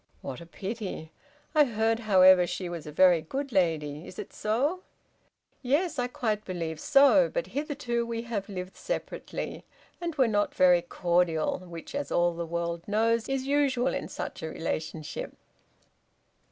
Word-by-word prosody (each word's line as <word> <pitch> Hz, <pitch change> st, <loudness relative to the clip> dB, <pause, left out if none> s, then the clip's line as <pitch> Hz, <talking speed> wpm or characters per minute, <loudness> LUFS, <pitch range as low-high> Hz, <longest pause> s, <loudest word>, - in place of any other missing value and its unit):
"What 130 Hz, -, -6 dB
a 170 Hz, -, -11 dB
pity! 190 Hz, -4 st, -6 dB, 0.4 s
I 305 Hz, -2 st, +6 dB
heard, 225 Hz, -3 st, +1 dB
however, 185 Hz, -4 st, +6 dB
she 180 Hz, +1 st, -4 dB
was 170 Hz, -3 st, -6 dB
a -, -, -6 dB
very 175 Hz, +1 st, +5 dB
good 270 Hz, -, -4 dB
lady. 160 Hz, -5 st, 0 dB
Is 185 Hz, -, -11 dB
it -, -, -7 dB
so?" 275 Hz, +12 st, 0 dB, 0.8 s
"Yes, 290 Hz, +4 st, +1 dB
I 245 Hz, -, +1 dB
quite 215 Hz, -4 st, -2 dB
believe 165 Hz, -5 st, -4 dB
so; 285 Hz, -, +5 dB
but -, -, -2 dB
hitherto 280 Hz, -5 st, -2 dB
we 230 Hz, 0 st, -4 dB
have 220 Hz, -4 st, -4 dB
lived 185 Hz, -1 st, -6 dB
separately, -, -, -5 dB, 0.4 s
and 340 Hz, -2 st, -3 dB
were 260 Hz, -4 st, +4 dB
not 205 Hz, -2 st, 0 dB
very 180 Hz, -1 st, +5 dB
cordial, 175 Hz, -2 st, +1 dB
which, 175 Hz, -2 st, -10 dB
as 285 Hz, 0 st, -3 dB
all 175 Hz, 0 st, +3 dB
the 170 Hz, 0 st, -4 dB
world 170 Hz, 0 st, -2 dB
knows, 225 Hz, +3 st, +1 dB
is 270 Hz, -1 st, -1 dB
usual 270 Hz, -3 st, +2 dB
in -, -, -3 dB
such -, -, -6 dB
relationship." 160 Hz, -1 st, -4 dB
205 Hz, 155 wpm, -28 LUFS, 170-255 Hz, 0.8 s, I